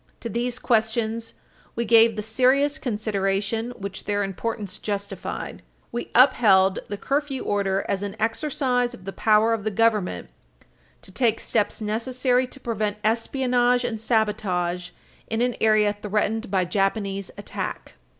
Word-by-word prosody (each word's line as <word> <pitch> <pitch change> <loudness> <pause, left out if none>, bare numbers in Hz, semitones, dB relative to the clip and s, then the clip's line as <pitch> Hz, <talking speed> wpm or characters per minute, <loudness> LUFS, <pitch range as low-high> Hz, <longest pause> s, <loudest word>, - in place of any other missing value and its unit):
To 235 - -4
these 240 +3 -2
questions, 225 -1 0 0.4
we 235 - -1
gave 230 0 +6
the 210 - -3
serious 260 +6 +2
consideration 210 -1 -1
which 200 0 -7
their 205 0 0
importance 200 0 -4
justified. 200 -1 -5 0.3
We 240 - -4
upheld 205 -7 +5
the 205 - -4
curfew 280 +2 -1
order 195 -1 0
as 195 - -1
an 205 0 -4
exercise 245 +1 0
of 185 - -16
the 195 - -5
power 220 +1 +3
of 225 -3 -2
the 215 - 0
government 210 - 0 0.7
to - - -11
take 225 +1 +1
steps 215 0 -1
necessary 250 +4 0
to 270 - -11
prevent 215 -4 -2
espionage 245 +2 +2
and 225 -3 -3
sabotage 185 -6 0 0.4
in 225 +2 0
an 245 -1 0
area 215 -1 +4
threatened 210 +2 -1
by 190 -2 +1
Japanese 195 +1 -1
attack. 205 - -5
220 Hz, 140 wpm, -24 LUFS, 200-240 Hz, 0.7 s, gave